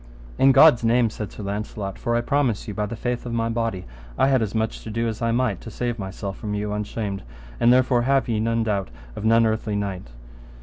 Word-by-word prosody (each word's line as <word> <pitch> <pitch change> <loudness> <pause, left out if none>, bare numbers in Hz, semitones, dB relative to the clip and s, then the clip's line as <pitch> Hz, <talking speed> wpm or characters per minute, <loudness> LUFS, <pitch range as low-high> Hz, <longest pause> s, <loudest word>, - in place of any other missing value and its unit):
In 135 - +6
God's 130 -4 +7
name, 115 0 +3
said 105 -2 -6
Sir 105 - -8
Launcelot, 100 -1 -4
for 120 - -1
I 120 - +2
promise 130 -4 0
you, 105 - -4
by 105 0 -2
the 115 - -5
faith 120 +1 -3
of 120 - -4
my 115 0 0
body, 115 -5 -2 0.3
I 135 - +4
had 130 -3 +3
as 110 -1 -2
much 110 0 -1
to - - -7
do 115 +2 -1
as 110 0 -4
I 115 0 +1
might 115 -5 0
to - - -8
save 120 +1 -3
myself 95 0 -5
from 105 -2 -3
you 105 0 -2
unshamed, 105 -1 -3 0.4
and 120 - +5
therefore 125 -1 +4
have 135 +2 +2
ye 115 -3 0
no 115 +1 +1
doubt 100 -3 -1 0.3
of 105 - -5
none 115 +1 +5
earthly 110 -1 -1
knight. 100 -6 -3
115 Hz, 230 wpm, -23 LUFS, 105-120 Hz, 0.4 s, God's